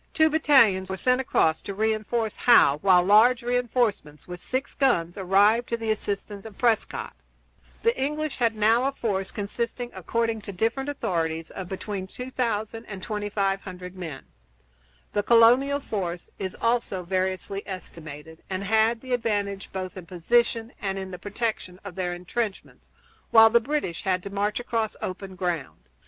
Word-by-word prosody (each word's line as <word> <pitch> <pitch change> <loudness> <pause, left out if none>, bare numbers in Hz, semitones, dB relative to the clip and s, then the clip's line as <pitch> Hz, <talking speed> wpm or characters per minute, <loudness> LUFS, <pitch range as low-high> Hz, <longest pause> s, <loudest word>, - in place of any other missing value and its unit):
] - - -39
Two 315 -1 +4
battalions 235 -12 +4
were 190 - -3
sent 250 +7 +2
across 160 -10 +2
to 200 - -6
re 220 +2 +2
enforce 220 0 -2
Howe, 150 - +5
while 180 -2 +5
large 230 +6 +5
re 245 +1 0
enforcements, 230 - -1
with 180 0 -7
six 260 +8 -3
guns, 175 -11 +1
arrived 205 +5 +3
to 235 - 0
the 225 -1 -1
assistance 205 -1 -4
of 220 -3 -11
Prescott. 230 -3 0 0.7
The 465 +1 +3
English 300 +1 -2
had 230 -3 +1
now 225 +4 +3
a 275 - 0
force 195 -7 -2
consisting, 235 +4 -4
according 230 -1 -1
to 200 - -7
different 225 +8 -1
authorities, 165 - -2
of 185 -2 -7
between 190 0 -5
2000 230 -2 -3
and 190 -2 -8
2500 195 -3 -3
men. 165 -7 -7 0.9
The 205 - +2
colonial 245 +6 +5
force 180 -9 -4
is 190 -2 -4
also 230 -5 0
variously 185 +2 -2
estimated, 160 -4 -9
and 190 0 -3
had 220 +3 +2
the 255 -1 -4
advantage 205 -4 -1
both 185 -1 -5
in 180 -3 -9
position 230 +6 +1
and 195 -1 -2
in 190 -1 -5
the 180 - -7
protection 205 -3 -3
of 200 -2 -8
their 180 -1 -2
intrenchments, 195 +4 -5 0.4
while 225 0 +8
the 235 +1 +5
British 260 - -2
had 185 -2 0
to 200 - -7
march 205 +2 -1
across 230 -3 -2
open 190 0 -6
ground. 175 - -4
205 Hz, 160 wpm, -25 LUFS, 185-235 Hz, 0.9 s, while